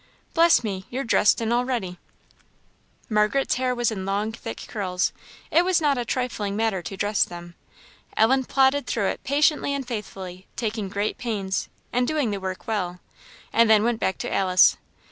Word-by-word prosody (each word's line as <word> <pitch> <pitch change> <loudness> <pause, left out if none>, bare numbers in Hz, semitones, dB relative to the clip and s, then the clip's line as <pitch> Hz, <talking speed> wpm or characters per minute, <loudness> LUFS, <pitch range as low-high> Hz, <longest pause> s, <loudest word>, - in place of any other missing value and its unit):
Bless 335 -5 +5
me! 195 -3 -4
you're 260 +3 -3
dressed 225 -2 +3
and 225 +1 0
all 245 +1 +2
ready." 210 -9 -3 1.1
Margaret's 215 +5 +2
hair 255 -1 0
was 240 -2 +1
in 195 -3 -4
long, 200 +3 -1
thick 115 - -7
curls; 185 -4 -1 0.4
it 340 - +5
was 365 -1 +2
not 295 -3 +2
a - - 0
trifling 215 -6 -2
matter 220 -4 0
to 195 +2 -7
dress 205 +1 +2
them. 175 0 -8 0.6
Ellen 260 +4 +4
plodded 270 +2 +2
through 205 -4 0
it - - -5
patiently 285 0 +2
and 275 -3 -4
faithfully, 190 -5 -7
taking 215 -3 -3
great 205 +2 -2
pains, 200 -5 -2 0.2
and 245 0 +2
doing 295 -8 0
the 200 - -3
work 190 -1 -5
well, 180 -5 -2 0.5
and 230 -1 +5
then 215 -1 +6
went 235 -1 0
back 190 - 0
to - - -4
Alice. 185 -1 +5
220 Hz, 175 wpm, -24 LUFS, 195-250 Hz, 1.1 s, then